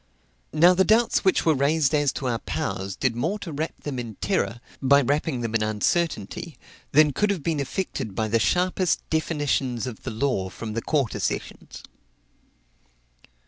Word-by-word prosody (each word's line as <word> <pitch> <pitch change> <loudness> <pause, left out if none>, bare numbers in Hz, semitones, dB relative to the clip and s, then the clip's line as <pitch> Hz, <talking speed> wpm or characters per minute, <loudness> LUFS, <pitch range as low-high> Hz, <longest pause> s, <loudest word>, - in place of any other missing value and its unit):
Now 170 +4 +6
the 190 +1 +3
doubts 225 +4 +3
which 190 - +2
were 160 - +5
raised 145 +1 +2
as 145 -2 +3
to 135 - -5
our 120 -2 0
powers 95 0 -3
did 125 -3 0
more 165 - -1
to 200 -5 -7
wrap 155 +3 -4
them 140 -4 -4
in 115 -3 -6
terror, 180 - -1 0.2
by 140 +1 +5
wrapping 145 -1 0
them 115 -1 -3
in 115 - +1
uncertainty, 110 - -1 0.3
than 150 0 +5
could 210 +9 +1
have 190 -7 -1
been 160 -2 0
effected 140 - -3
by 110 +1 0
the 115 +2 +2
sharpest 180 - +1
definitions 145 -6 0
of 125 -4 -7
the - - -5
law 110 -5 -1
from 110 +3 -7
the 115 - -2
Quarter 135 -4 0
Sessions. - - -4
140 Hz, 170 wpm, -25 LUFS, 115-165 Hz, 0.3 s, Now